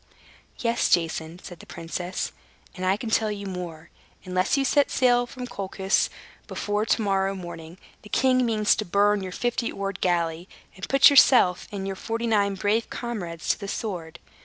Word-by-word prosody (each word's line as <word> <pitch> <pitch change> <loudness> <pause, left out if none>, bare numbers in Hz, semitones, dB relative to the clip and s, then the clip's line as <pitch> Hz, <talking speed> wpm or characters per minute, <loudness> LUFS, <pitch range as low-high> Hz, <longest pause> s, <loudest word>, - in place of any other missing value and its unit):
"Yes, 235 -2 0
Jason," 165 -1 0
said 175 -3 -10
the - - -14
princess, 175 +2 -4 0.4
"and 185 -1 -3
I 190 +2 +3
can 220 +1 -5
tell 220 -1 +2
you 200 -1 -6
more. 175 -4 -7 0.3
Unless 185 +7 +1
you 275 - +1
set 285 +1 +3
sail 245 -1 +3
from 250 0 -7
Colchis 195 -3 -1 0.4
before 210 +1 -2
to 225 - +2
morrow's 195 -1 0
sunrise, 170 -1 -9 0.2
the 210 - -14
king 255 +1 +3
means 215 -3 +2
to - - -1
burn 205 +2 +2
your 185 -1 -5
fifty 240 +4 -1
oared 195 -1 -5
galley, 170 0 0 0.3
and 190 - -7
put 275 +1 +7
yourself 250 -9 +5
and 195 -2 -4
your 195 0 -3
forty 225 +4 -3
nine 205 -3 +2
brave 210 +4 0
comrades 180 -9 -5
to - - +2
the 200 - -6
sword. 175 -6 -5
200 Hz, 175 wpm, -25 LUFS, 180-230 Hz, 0.4 s, put